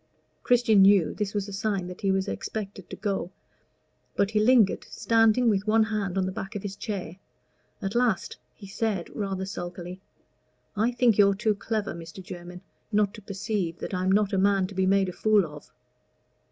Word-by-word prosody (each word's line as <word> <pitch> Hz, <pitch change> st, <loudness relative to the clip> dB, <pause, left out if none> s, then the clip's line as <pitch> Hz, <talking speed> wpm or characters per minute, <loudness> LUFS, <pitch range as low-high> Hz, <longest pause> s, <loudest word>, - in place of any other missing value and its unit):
Christian 235 Hz, -4 st, +4 dB
knew 195 Hz, -3 st, +5 dB
this 210 Hz, -1 st, -3 dB
was 205 Hz, -1 st, -1 dB
a 200 Hz, -, -8 dB
sign 195 Hz, -2 st, -1 dB
that 180 Hz, 0 st, -9 dB
he 195 Hz, -, 0 dB
was 190 Hz, +1 st, +1 dB
expected 200 Hz, -3 st, -5 dB
to -, -, -6 dB
go, 195 Hz, -4 st, -2 dB, 0.9 s
but 200 Hz, +1 st, +1 dB
he 215 Hz, -, +2 dB
lingered 220 Hz, -2 st, +4 dB
standing, 225 Hz, +1 st, +3 dB
with 205 Hz, -1 st, +1 dB
one 220 Hz, +1 st, +4 dB
hand 210 Hz, -4 st, -2 dB
on 190 Hz, -, +1 dB
the 185 Hz, -, -2 dB
back 195 Hz, +3 st, -6 dB
of 205 Hz, -, -4 dB
his 200 Hz, -1 st, -5 dB
chair. 195 Hz, -5 st, -5 dB, 0.7 s
At 195 Hz, +1 st, -2 dB
last, 240 Hz, -6 st, 0 dB, 0.2 s
he 205 Hz, -, -12 dB
said 200 Hz, -2 st, -3 dB
rather 195 Hz, -3 st, -3 dB
sulkily 180 Hz, -1 st, -7 dB, 0.7 s
"I 220 Hz, +4 st, +2 dB
think 240 Hz, -3 st, +2 dB
you're 200 Hz, -1 st, +6 dB
too 215 Hz, +1 st, +1 dB
clever, 210 Hz, 0 st, -3 dB
Mr. 165 Hz, +2 st, -10 dB
Jermyn, 180 Hz, 0 st, -9 dB, 0.3 s
not 205 Hz, -1 st, +2 dB
to 215 Hz, -, -11 dB
perceive 195 Hz, -3 st, -3 dB
that -, -, -6 dB
I'm 185 Hz, +1 st, 0 dB
not 205 Hz, +1 st, +2 dB
a 195 Hz, -, +2 dB
man 195 Hz, -1 st, +3 dB
to 195 Hz, -, -8 dB
be 190 Hz, 0 st, +1 dB
made 195 Hz, 0 st, +3 dB
a 180 Hz, -, -5 dB
fool 210 Hz, -2 st, +3 dB
of." 150 Hz, -2 st, -12 dB
200 Hz, 190 wpm, -26 LUFS, 190-215 Hz, 0.9 s, you're